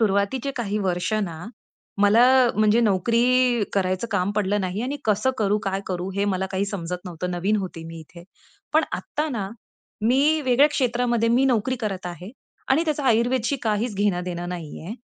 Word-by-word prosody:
सुरुवातीचे 220 +6 +1
काही 210 -3 -2
वर्ष 185 +1 -1
ना, 170 -1 -7 0.6
मला 220 +4 +6 0.3
म्हणजे 215 +2 +4
नोकरी 235 +3 +2
करायचं 185 +2 0
काम 200 -1 0
पडलं 205 0 +1
नाही 185 +4 -3
आणि 275 +3 -2
कसं 215 +5 +2
करू, 210 0 +2
काय 195 0 -1
करू 185 0 -3
हे 200 - +1
मला 190 -1 0
काही 195 +1 0
समजत 180 -3 -4
नव्हतं. 180 +1 -4
नवीन 195 +5 0
होते 180 -4 -5
मी 165 0 -8
इथे. 170 +2 -14 0.5
पण 315 +1 +4
आत्ता 305 +1 -3
ना 205 -7 -3 0.5
मी 280 +7 +3
वेगळ्या 260 +3 +5
क्षेत्रामध्ये 240 -4 0
मी 250 +3 +3
नोकरी 255 +1 +1
करत 195 -5 -3
आहे 180 +3 -7 0.4
आणि 315 +5 +3
त्याचं 300 -2 -1
आयुर्वेदशी 240 +2 +2
काहीच 220 +1 -1
घेणं-देणं 180 -3 -1
नाहीये. 170 +2 -7
210 Hz, 165 wpm, -23 LUFS, 185-240 Hz, 0.6 s, मला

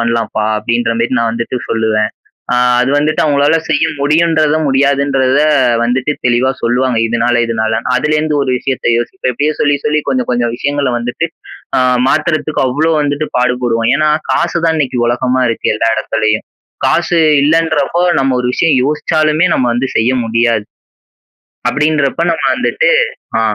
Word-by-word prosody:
பண்ணலாம்ப்பா! 115 -2 -1
அப்பிடின்றமாரி 115 +2 -1
நான் 115 -1 0
வந்துட்டு 115 +2 -3
சொல்லுவேன். 110 -1 0 0.4
ஆ - - +2 0.2
அது 130 +2 +1
வந்துட்டு 150 +1 0
அவுங்களால 145 +1 +2
செய்ய 155 0 +2 0.2
முடியும்ன்றத, 155 +1 +2
முடியாதுன்றத 140 0 +1 0.4
வந்துட்டு 130 +4 0
தெளிவா 125 +2 +2
சொல்லுவாங்க. 125 0 0
இதுனால 120 +1 0
இதுனாலன்னு. 110 +2 -2
அதுல 150 +4 0
இருந்து 155 -1 -1
ஒரு 130 - -1
விஷயத்த 135 0 -3
யோசிப்பேன். 125 +1 -3
இப்பிடியே 150 +5 -1
சொல்லி, 145 0 +2
சொல்லி 150 0 +1
கொஞ்சம் 130 -2 -1
கொஞ்சம் 120 -1 0
விஷயங்கள 140 0 -1
வந்துட்டு 125 +7 -3 0.5
அ - - +2 0.3
மாத்துறதுக்கு 155 -1 0
அவ்ளோ 155 +6 0
வந்துட்டு 145 +1 -1
பாடுபடுவோம். 125 -2 0
ஏன்னா, 155 +1 +1 0.2
காசு 170 - 0
தான் 160 -1 +2
இன்னக்கி 130 -4 -1
உலகமா 125 +1 0
இருக்கு 115 - -1
எல்லா 115 - 0
இடத்துலயும். 110 0 -1 0.4
காசு 170 0 +1 0.2
இல்லன்றப்போ 165 +2 +1 0.2
நம்ம 135 -1 +1
ஒரு 125 - -1
விஷயம் 160 -5 +2
யோசிச்சாலுமே 155 +2 +1
நம்ம 125 - +1
வந்து 130 +2 -1
செய்ய 115 +3 +2
முடியாது. 115 -1 0 1.0
அப்பிடின்றப்ப 150 0 0
நம்ம - - -3
வந்துட்டு, - - 0 0.5
அ - - +1
130 Hz, 145 wpm, -13 LUFS, 120-150 Hz, 1.0 s, ஆ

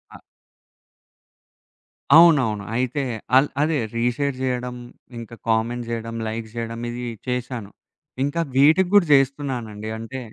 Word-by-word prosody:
ఆ - - -12 2.0
అవునవును. 135 -12 +5
అయితే 130 +3 -1 0.3
అల్ 135 +2 +4
అదే 155 +1 +1 0.2
రీషేర్ 125 +4 0
చేయడం, 125 -1 -2 0.4
ఇంకా 115 0 -9
కామెంట్ 115 +2 0
జేయడం 115 0 -4
లైక్ 110 +1 -4
జేయడం 115 0 -5
ఇది 120 +1 -5 0.2
చేశాను. 125 -4 -4 0.5
ఇంకా 145 +4 -1
వీటికి 155 +7 +5
గూడా 200 -5 +6
జేస్తున్నానండి. 130 -6 0
అంటే 115 +4 -7
125 Hz, 110 wpm, -22 LUFS, 115-140 Hz, 2.0 s, గూడా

